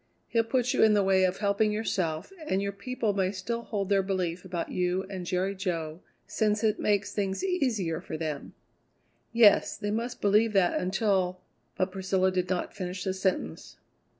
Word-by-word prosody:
He'll 230 -1 +2
put 245 +2 0
you - - +2
in 215 -1 +6
the 205 - +3
way 190 -1 +4
of 185 0 0
helping 205 +1 +2
yourself, 185 - -2
and 190 - +1
your 200 0 -1
people 215 +1 -2
may 190 -1 +1
still 205 +5 -3
hold 205 -4 -3
their 200 -1 +4
belief 185 -2 -2
about 180 -3 -4
you 180 +1 0
and 185 -2 -5
Jerry 185 +2 0
Jo, 170 -4 -3 0.2
since 210 0 0
it 215 -1 +2
makes 205 0 +1
things 195 - -2
easier 250 - 0
for 160 - -6
them." 155 -3 -5 0.8
"Yes; 225 -3 +5
they 205 - -3
must 235 +3 -3
believe 210 +2 +3
that 190 -3 +3
until 185 -1 0 0.2
" - - -39
But 185 0 0
Priscilla 190 0 +1
did 180 -1 -1
not 185 -1 -2
finish 185 0 -4
the 190 - -1
sentence. 185 - -2
195 Hz, 180 wpm, -28 LUFS, 185-210 Hz, 0.8 s, in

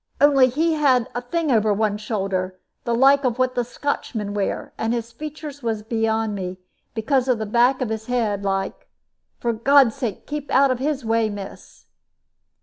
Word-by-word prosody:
"Only 275 -3 +6
he 320 +6 +1
had 265 -6 +3
a 245 - -3
thing 310 +4 -1
over 220 -3 +3
one 210 0 0
shoulder, 190 -4 -2 0.3
the 235 - +1
like 275 +3 +5
of 250 -2 0
what 255 0 +1
the 245 - 0
Scotchmen 230 -5 -3
wear; 205 -1 -3
and 225 +2 -1
his 230 0 -4
features 300 +2 -8
was 225 -3 -2
beyond 225 -1 0
me, 185 -2 -4 0.4
because 255 +3 +1
of 250 -2 +2
the 220 - -3
back 245 +5 +3
of 250 - -1
his 220 0 -4
head, 220 -5 0
like. 195 -1 -2 0.5
For 235 -1 -1
God's 260 +1 +5
sake 225 -7 -4
keep 295 -1 -5
out 270 0 +4
of 255 - -1
his 280 -2 -2
way, 225 0 +2
miss." 200 -2 -9
235 Hz, 180 wpm, -22 LUFS, 215-270 Hz, 0.5 s, Only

